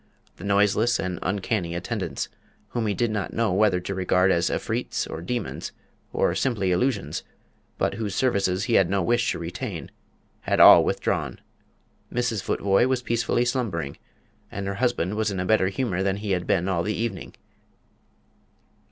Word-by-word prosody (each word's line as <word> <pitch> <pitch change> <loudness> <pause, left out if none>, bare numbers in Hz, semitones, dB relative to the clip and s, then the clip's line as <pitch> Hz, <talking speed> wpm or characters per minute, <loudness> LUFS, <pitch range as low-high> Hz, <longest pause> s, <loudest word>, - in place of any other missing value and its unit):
The - - -11
noiseless 105 +4 +2
and 90 -1 -3
uncanny 95 -2 -1
attendants, 90 - -3 0.4
whom 115 -2 -2
he 100 - 0
did 120 -2 0
not 105 -3 -3
know 115 -4 +1
whether 100 -2 +3
to 95 - -4
regard 95 0 +2
as 85 -1 +2
Efreets, - - -2
or 80 - -6
demons, 115 +5 -4 0.4
or - - +1
simply 105 -8 0
illusions, 105 +4 0 0.6
but - - 0
whose 105 -4 -3
services 100 -7 +1
he 120 0 -1
had 95 -5 +4
no 100 -1 +1
wish 120 +5 +2
to - - -3
retain, 85 +3 -5 0.5
had - - -1
all - - +10
withdrawn. - - -1 0.7
Mrs. 120 -4 -1
Futvoye 100 +5 +2
was 130 -1 0
peacefully 120 +1 +1
slumbering, 105 - -2 0.6
and 100 0 -4
her 100 - -2
husband 120 -7 +1
was 110 -1 0
in 95 -2 -3
a 90 - -1
better 100 -1 +3
humour 95 -2 -1
than 95 0 0
he 105 -1 -4
had 90 -1 -1
been 90 -1 +1
all 90 -3 +1
the 105 +4 -1
evening. 115 -4 -4
100 Hz, 165 wpm, -25 LUFS, 90-115 Hz, 0.7 s, all